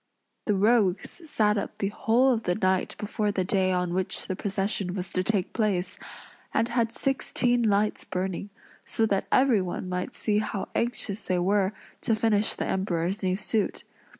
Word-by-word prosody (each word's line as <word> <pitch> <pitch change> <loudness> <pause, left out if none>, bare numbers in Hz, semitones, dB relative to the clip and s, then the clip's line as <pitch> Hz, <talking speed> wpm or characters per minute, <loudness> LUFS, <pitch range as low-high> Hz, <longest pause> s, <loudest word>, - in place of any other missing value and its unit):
The 210 - +3
rogues 215 - +1
sat 210 -5 +2
up - - -6
the 195 - -1
whole 240 +5 +3
of 225 - -1
the 180 -4 0
night 185 -2 +1
before 210 0 -1
the 190 -2 0
day 185 0 +1
on 180 -1 0
which 185 0 0
the 185 - -3
procession 195 -1 -2
was 180 -2 -2
to 185 - +1
take 195 -2 0
place, 200 -3 0 0.6
and 230 +1 +2
had 235 -2 +1
sixteen 245 -1 +1
lights 210 -1 +1
burning, 190 +2 -3 0.3
so 225 - 0
that 200 -3 0
everyone 210 -9 +2
might 180 0 -3
see 210 -1 +1
how 210 -2 -3
anxious 225 -3 -1
they 185 - +1
were 195 +2 +2 0.3
to 225 - +2
finish 215 -1 +2
the - - -2
Emperor's 190 0 -1
new 185 -1 +1
suit. 210 +1 -1
205 Hz, 170 wpm, -27 LUFS, 185-220 Hz, 0.6 s, The